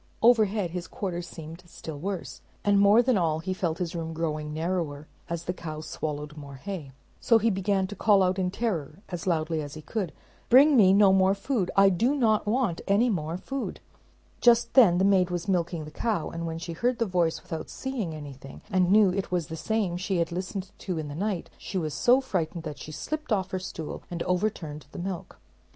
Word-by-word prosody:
Overhead 215 -6 +4
his 175 -1 -5
quarters 175 -2 -4
seemed 165 +1 -9
still 160 -3 -8
worse, 190 +1 -5 0.2
and 200 -1 +4
more 205 +4 +6
than 245 -5 +3
all, 160 -3 +1
he 175 +4 -3
felt 170 -3 -1
his 175 -2 -3
room 165 -1 -4
growing 155 -2 -2
narrower, 160 -2 -2 0.2
as 170 0 -3
the 180 - -2
cow 155 -3 -6
swallowed 150 -1 -5
more 140 -2 -9
hay. 160 -2 -6 0.3
So 230 - +5
he 225 +1 +2
began 195 0 +1
to 205 - -7
call 205 -3 +4
out 185 +1 +1
in 180 -1 +1
terror 180 -8 -2
as 175 -1 -5
loudly 160 -2 0
as 145 0 -7
he 155 - -9
could, 195 -5 -3 0.4
"Bring 280 +4 +7
me 200 -6 +7
no 195 -1 +6
more 190 0 +4
food. 200 -3 -1
I 195 0 +7
do 230 +10 +2
not 220 -6 +2
want 220 -6 +1
any 225 +5 +3
more 165 -3 -2
food!" 270 +7 -5 0.6
Just 235 -1 +4
then 210 -10 +7
the 190 - +3
maid 190 -2 +4
was 175 +1 -3
milking 170 -4 0
the 155 - -10
cow, 200 -2 -1
and 170 0 -4
when 165 0 -4
she 170 0 -5
heard 240 +8 0
the 230 - +1
voice 175 -4 +1
without 160 -1 -6
seeing 235 -12 -4
anything, 140 -3 -10
and 185 -2 +3
knew 205 -2 +6
it 195 0 -2
was 175 -3 -1
the 160 - -4
same 200 -1 -1
she 185 +1 -1
had 170 0 0
listened 185 +2 -4
to 180 -4 -3
in 155 -2 -4
the - - -6
night, 195 0 -2
she 195 - -5
was 155 -4 -2
so 250 +1 +4
frightened 170 -10 -2
that 150 -3 -6
she 155 - -8
slipped 305 - -5
off 190 -2 +1
her 185 - -1
stool 165 -4 -6
and 170 -1 -3
overturned 180 -6 -2
the - - -8
milk. 180 -1 -5
180 Hz, 210 wpm, -27 LUFS, 160-205 Hz, 0.6 s, Bring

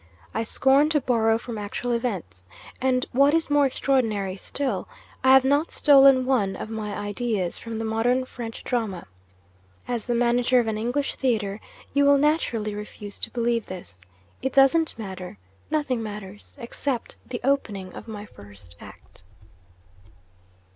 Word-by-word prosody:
I - - -1
scorn 270 +6 +3
to 310 -1 +3
borrow 225 -4 +2
from 230 -1 -7
actual 210 +4 -3
events; 190 - -3 0.3
and, 255 -1 +2
what 280 +4 +4
is 325 -2 0
more 290 -1 +5
extraordinary 225 -8 0
still, 265 +7 -3 0.4
I 260 - +6
have 265 -1 +7
not 285 +4 +2
stolen 275 -3 +6
one 220 -8 +1
of 220 - -7
my 215 -2 -4
ideas 205 -3 -2
from 230 -1 -6
the 225 - -3
Modern 240 +4 +1
French 235 -3 -8
drama. 220 -8 -2 0.8
As 240 -3 -2
the 240 - 0
manager 245 +1 +3
of 240 - +1
an 220 -1 -1
English 245 +5 -1
theatre, 215 -5 -1 0.3
you 285 +1 +3
will 280 0 +6
naturally 275 -8 +1
refuse 205 -1 -8
to - - -3
believe 235 -1 -1
this. 175 - -9 0.4
It 265 0 -2
doesn't 275 +3 +4
matter. 190 - -7 0.3
Nothing 280 -6 0
matters 210 -2 -8
except 250 0 -4
the 245 - -4
opening 210 -9 -1
of - - -10
my 210 -2 -7
first 100 - -14
act. - - -15
235 Hz, 150 wpm, -25 LUFS, 210-265 Hz, 0.8 s, have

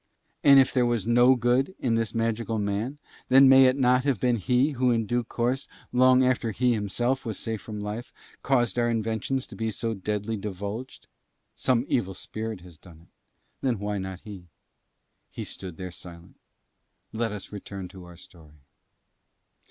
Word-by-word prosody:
And 140 -1 +8
if 130 - +3
there 125 -2 +3
was 120 -5 0
no 120 +2 +5
good 125 +8 +1
in 120 -3 0
this 115 -1 -1
magical 115 0 -1
man, 105 +7 -2 0.3
then 135 +1 +7
may 135 0 +8
it 130 - +3
not 125 -1 +3
have 135 -7 0
been 125 +1 +2
he 125 +7 +2
who 130 -2 +1
in 115 -2 +1
due 120 +3 0
course, 125 +3 -2 0.3
long 130 +1 +5
after 125 -2 +1
he 125 +3 +1
himself 120 +5 -1
was 110 -5 -4
safe 110 -2 -4
from 105 -2 -7
life, 105 +4 -5 0.3
caused 120 -3 +1
our 120 0 +2
inventions 115 +3 -1
to - - -12
be 115 0 -2
so 115 +2 -3
deadly 105 +2 -3
divulged? 100 +5 -6 0.5
Some 125 -1 +1
evil 95 -6 -1
spirit 110 +1 -6
has 85 -3 -15
done 85 -2 -16
it, 85 - -22 0.5
then 125 -4 0
why 105 0 -3
not 95 -1 -6
he? 100 -5 -10 0.8
He - - -6
stood 90 -4 -7
there 90 -1 -6
silent: 85 0 -13 0.7
let 115 0 -1
us 105 -2 -7
return 100 -2 -7
to 90 -1 -12
our 90 -1 -13
story. 75 -5 -17
115 Hz, 175 wpm, -26 LUFS, 100-125 Hz, 0.8 s, And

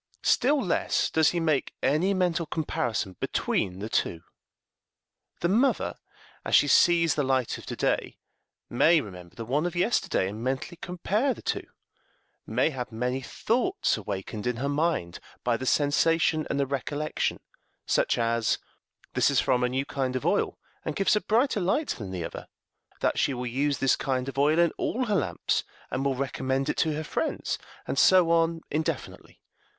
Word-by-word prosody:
Still 285 +3 +3
less 190 -9 0
does 160 -1 +4
he 175 - -1
make 155 -4 0
any 160 +9 +2
mental 175 -3 0
comparison 120 - -2
between 90 -1 -1
the 100 +3 -5
two. 85 -6 -1 1.2
The 170 - +2
mother, 235 +9 +2 0.5
as - - +2
she - - +6
sees 170 -3 +5
the 150 - 0
light 130 -3 0
of - - -13
to - - -4
day, - - -1 0.5
may 160 +7 +4
remember 90 - -9
the 115 - -6
one 145 +8 0
of 175 - -5
yesterday, 175 - +1
and 105 +4 -6
mentally 135 +7 -3
compare 210 +9 0
the - - -13
two; - - -2 0.8
may - - +1
have 125 -3 -5
many 125 +4 -2
thoughts 250 - 0
awakened 105 +1 -5
in 125 - 0
her 130 +4 -2
mind 145 - -1 0.2
by 120 -1 +2
the 130 +2 -4
sensation 155 +3 +2
and 140 - -1
the 140 - +2
recollection 145 +3 -2 0.5
such - - +2
as, 115 -1 +1 0.6
this - - +3
is - - +3
from 125 -1 +2
a 125 - +2
new 135 +2 -1
kind 130 -2 -2
of 130 - -3
oil, - - +1 0.3
and 155 - -3
gives 195 +3 +3
a 210 - +1
brighter 230 +1 +2
light 200 - 0
than 100 -5 -4
the 90 -3 -4
other; - - -8 0.5
that - - +1
she 140 - +1
will 125 0 -4
use 140 +4 0
this 135 - +3
kind 130 -1 -2
of 135 0 -4
oil 150 +3 +4
in 170 -2 +4
all 255 +2 0
her 215 - -1
lamps, 85 - 0 0.3
and 130 - -1
will 140 -1 +1
recommend 135 +1 -1
it - - -1
to 160 - +2
her 155 - -3
friends, - - -2 0.3
and 135 - 0
so 180 -3 +6
on 165 0 +2
indefinitely. 155 +2 -4
140 Hz, 175 wpm, -27 LUFS, 125-170 Hz, 1.2 s, she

